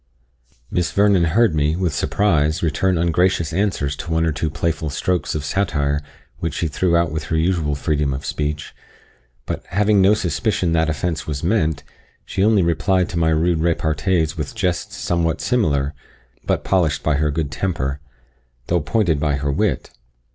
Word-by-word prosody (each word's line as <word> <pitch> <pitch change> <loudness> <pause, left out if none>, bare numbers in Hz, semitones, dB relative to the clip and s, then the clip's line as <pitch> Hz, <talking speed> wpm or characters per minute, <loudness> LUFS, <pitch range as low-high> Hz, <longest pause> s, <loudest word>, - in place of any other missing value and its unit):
Miss 90 -1 0
Vernon 100 -3 +4
heard 100 +4 +3
me, 75 +1 +1
with 90 -3 -1
surprise, 80 -3 +1
return 90 +3 +1
ungracious 85 0 +1
answers 85 -7 0
to 85 - -7
one 80 0 +1
or 80 - +1
two 80 +2 -2
playful 80 +1 -2
strokes 90 +5 -1
of 75 -1 -3
satire 75 -5 0 0.4
which 85 - -3
she 85 - -1
threw 85 +3 +1
out 85 -2 +1
with 75 -1 -3
her 80 - -1
usual 80 -3 +1
freedom 75 -1 0
of 65 +1 -5
speech; 75 0 -3 0.7
but, - - -4
having 105 +1 +3
no 100 +3 +5
suspicion 90 0 0
that 80 -1 +2
offence 80 +1 -2
was 75 -1 -4
meant, 80 -6 +1 0.4
she 95 - -1
only 105 -3 +4
replied 85 +2 +1
to 85 - -2
my 80 -1 +3
rude 80 +1 +2
repartees 80 0 0
with 125 - -5
jests 90 -5 -2
somewhat 85 -2 0
similar, 75 - +1 0.5
but - - -1
polished 85 -6 +1
by 75 -3 +2
her 75 +1 +1
good 75 -1 -2
temper, 70 -6 -2 0.7
though 85 -1 +2
pointed 85 -1 +1
by 75 -1 +1
her 70 +1 -1
wit. - - -1
80 Hz, 170 wpm, -20 LUFS, 75-90 Hz, 0.7 s, no